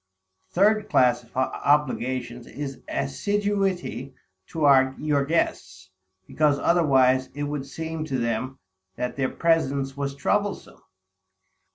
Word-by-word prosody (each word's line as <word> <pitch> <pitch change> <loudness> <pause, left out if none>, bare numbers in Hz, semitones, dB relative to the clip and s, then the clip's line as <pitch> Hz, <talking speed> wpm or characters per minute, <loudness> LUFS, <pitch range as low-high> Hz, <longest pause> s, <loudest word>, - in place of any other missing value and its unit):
The - - -30
third 210 +1 +3
class 125 -1 +3
of 120 +1 -16
obligations, 130 -3 0
is 140 -2 -7
assiduity 185 - -2 0.3
to 135 -4 +3
your 145 -2 0
guests; 95 - -2 0.3
because 150 +3 +1
otherwise, 130 -7 +3
it 145 - -3
would 145 -2 -4
seem 160 +2 -5
to 135 -4 -2
them, 120 +2 -2 0.4
that 125 - -3
their 135 -2 0
presence 140 -5 0
was 140 0 -3
troublesome. 205 +7 -2
140 Hz, 110 wpm, -25 LUFS, 130-160 Hz, 0.4 s, third